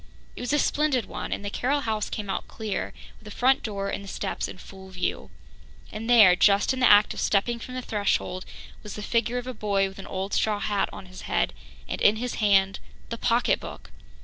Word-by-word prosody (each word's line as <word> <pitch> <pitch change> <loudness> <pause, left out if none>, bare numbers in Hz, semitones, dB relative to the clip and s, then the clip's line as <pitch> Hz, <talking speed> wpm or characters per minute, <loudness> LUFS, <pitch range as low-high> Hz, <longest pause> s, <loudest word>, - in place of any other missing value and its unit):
It - - -8
was 245 - -2
a 295 - +3
splendid 285 -5 +1
one, - - -6
and 205 - -3
the 200 - -3
Carroll 280 +6 0
house 220 -4 -2
came 210 -2 -4
out 195 - -3
clear, 220 -3 -4 0.3
with - - -21
the 210 - -10
front 260 +2 +4
door 200 -2 -3
and 200 - -4
the - - -10
steps - - -3
in - - -9
full 190 0 -12
view. 185 -1 -3 0.6
And 225 +2 -6
there, 215 -7 +8
just 200 +6 +4
in 260 - -4
the 250 - +5
act 205 0 +6
of - - -7
stepping 235 +4 +1
from 255 +2 -8
the 255 - -4
threshold, 200 -4 -1 0.4
was 210 - -8
the 210 - -6
figure 235 +2 0
of 245 - -4
a 255 - -5
boy 200 -3 0
with 195 0 -11
an 195 - -8
old 190 +1 -4
straw 210 -1 +1
hat 205 -1 0
on - - -9
his 185 0 -11
head - - +1 0.3
and - - -4
in 205 - +5
his 245 +2 -3
hand 195 -2 +3 0.3
the 230 - -4
pocketbook! 240 0 0
210 Hz, 225 wpm, -26 LUFS, 195-240 Hz, 0.6 s, there